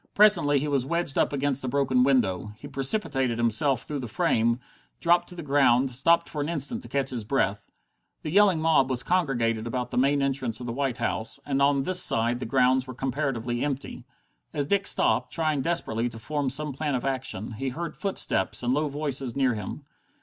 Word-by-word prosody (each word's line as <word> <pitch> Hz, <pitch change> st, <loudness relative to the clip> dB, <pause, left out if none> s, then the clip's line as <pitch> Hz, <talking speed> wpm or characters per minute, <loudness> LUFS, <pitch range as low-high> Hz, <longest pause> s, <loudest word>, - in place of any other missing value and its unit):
Presently 200 Hz, -9 st, +5 dB
he 145 Hz, +2 st, -1 dB
was 140 Hz, -3 st, +1 dB
wedged 170 Hz, +1 st, +1 dB
up -, -, +2 dB
against 140 Hz, -1 st, -1 dB
a -, -, -3 dB
broken 130 Hz, -1 st, +1 dB
window. 110 Hz, -7 st, +1 dB
He 145 Hz, -, -10 dB
precipitated 135 Hz, -, 0 dB
himself 120 Hz, +3 st, +1 dB
through 145 Hz, -1 st, -5 dB
the 125 Hz, -, -5 dB
frame, 115 Hz, +2 st, +1 dB, 0.4 s
dropped 175 Hz, 0 st, +2 dB
to 180 Hz, -, -11 dB
the 170 Hz, -, -7 dB
ground, 135 Hz, -3 st, +3 dB
stopped 155 Hz, +7 st, +2 dB
for 150 Hz, -, -5 dB
an 145 Hz, -, -2 dB
instant 170 Hz, -, -2 dB
to -, -, -10 dB
catch 135 Hz, -1 st, -1 dB
breath. 100 Hz, -7 st, -1 dB, 0.6 s
The 155 Hz, -, -4 dB
yelling 195 Hz, -2 st, +4 dB
mob 155 Hz, -4 st, +3 dB
was 130 Hz, -1 st, -1 dB
congregated 120 Hz, -10 st, 0 dB
about 125 Hz, +1 st, -3 dB
the -, -, 0 dB
main 140 Hz, +2 st, +2 dB
entrance 130 Hz, -5 st, -1 dB
of 125 Hz, -, -7 dB
the 115 Hz, -, -4 dB
White 135 Hz, -1 st, -2 dB
House, 115 Hz, +1 st, -2 dB
and 140 Hz, -1 st, -1 dB
on 140 Hz, -1 st, +3 dB
this 185 Hz, +4 st, +3 dB
side 120 Hz, -2 st, +1 dB
the 125 Hz, -, -5 dB
grounds 130 Hz, +1 st, +2 dB
were 130 Hz, -, -8 dB
comparatively 125 Hz, -3 st, -2 dB
empty. 140 Hz, -1 st, -4 dB, 0.5 s
As 145 Hz, -, +1 dB
Dick 195 Hz, +6 st, +1 dB
stopped, -, -, +3 dB
trying 155 Hz, -4 st, -1 dB
desperately 120 Hz, -7 st, -1 dB
to 115 Hz, -, -10 dB
form 145 Hz, +4 st, -2 dB
some 150 Hz, +2 st, -2 dB
plan 145 Hz, 0 st, -2 dB
of 125 Hz, -, -3 dB
action, 130 Hz, -6 st, -2 dB
he 130 Hz, +4 st, -4 dB
heard 165 Hz, +6 st, -5 dB
footsteps 155 Hz, -, 0 dB
and 125 Hz, +1 st, +1 dB
low 150 Hz, +2 st, 0 dB
voices 140 Hz, -4 st, -3 dB
near 135 Hz, -3 st, +2 dB
him. 105 Hz, +7 st, -6 dB
135 Hz, 200 wpm, -26 LUFS, 120-150 Hz, 0.6 s, Presently